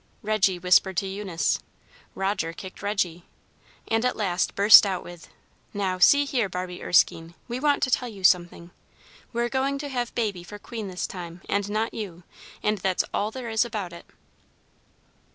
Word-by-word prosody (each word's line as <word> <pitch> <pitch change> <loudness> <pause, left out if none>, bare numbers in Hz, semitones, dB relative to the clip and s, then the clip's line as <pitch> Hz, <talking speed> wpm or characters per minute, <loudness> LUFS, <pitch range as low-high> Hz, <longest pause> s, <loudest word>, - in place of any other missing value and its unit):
Reggy 205 -3 +2
whispered 180 +1 +3
to 195 - +1
Eunice, 190 -3 -1 0.6
Roger 190 -4 -1
kicked 185 +2 -10
Reggy, 185 -5 -1 0.6
and 225 +1 +1
at 250 - +1
last 185 -4 -1
burst 205 +2 +9
out 190 -3 -2
with, 175 -1 -12 0.5
"Now, 190 -2 -1
see 285 +10 +6
here, 245 -7 0
Barbie 180 0 -5
Erskine, 165 -1 +2
we 245 +1 -4
want 290 0 +2
to 260 - +1
tell 250 -2 +1
you 200 -4 -11
something. 175 -1 +2 0.6
We're 235 0 0
going 270 +2 -1
to 285 +1 -5
have 245 -3 -3
Baby 205 -7 -2
for 205 +4 -10
queen 220 0 -7
this 185 -1 -4
time, 175 -1 -8
and 200 0 -1
not 215 +2 -1
you, 180 -5 -7 0.4
and 210 -1 +1
that's 185 0 +1
all 210 - 0
there 235 0 -6
is 220 +1 +3
about 205 -7 -5
it." 170 - -12
200 Hz, 170 wpm, -25 LUFS, 180-225 Hz, 0.6 s, burst